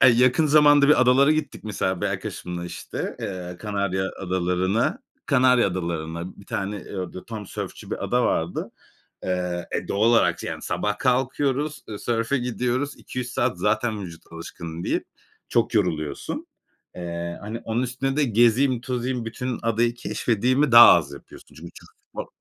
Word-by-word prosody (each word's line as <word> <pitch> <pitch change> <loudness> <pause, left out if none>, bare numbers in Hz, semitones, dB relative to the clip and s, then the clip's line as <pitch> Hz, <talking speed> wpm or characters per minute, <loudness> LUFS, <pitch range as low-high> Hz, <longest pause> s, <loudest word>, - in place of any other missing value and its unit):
Aaa, - - +8
yakın 125 +5 +4
zamanda 145 -1 +6
bir 150 - +6
adalara 130 +4 +5
gittik 155 -6 -3
mesela 95 -3 -2
bir - - 0
arkadaşımla 90 -1 -4
işte. 90 - -5
Eee, 90 -2 -5
Kanarya 100 -2 -1
Adaları'na. 95 +3 0 0.3
Kanarya 125 -1 +4
Adaları'na 85 -1 -4
bir 100 - -15
tane, 100 +2 -3
eee, 100 - -9
orada 90 0 -5
tam 110 -3 -7
sörfçü - - -7
bir - - -3
ada - - +1
vardı. - - -1 0.5
Eee, 90 -1 -2
e, - - -2
doğal 100 - -1
olarak 90 -7 +3
yani - - -5
sabah 105 0 -2
kalkıyoruz. 135 +3 0
Eee, 105 -2 -6
sörfe 115 +3 0
gidiyoruz. 125 +3 -2
2-3 125 -1 -6
saat 125 0 -1
zaten 110 -3 0
vücut 85 -3 -11
alışkın 85 0 -7
değil, - - 0 0.5
çok 120 0 +1
yoruluyorsun. 80 -8 -1 0.5
Eee, 85 -1 -5
hani, 110 +3 -6
onun 115 +2 -1
üstüne 130 +2 -2
de 150 - +3
gezeyim 120 +2 +3
tozayım 125 -1 -2
bütün 120 +2 -4
adayı 115 +1 +1
keşfedeyimi 125 +3 0
daha 120 0 +11
az 75 -5 +2
yapıyorsun. 70 - -13
Çünkü - - -10
çok - - -14 0.3
zor. - - -3
115 Hz, 155 wpm, -24 LUFS, 90-125 Hz, 0.5 s, daha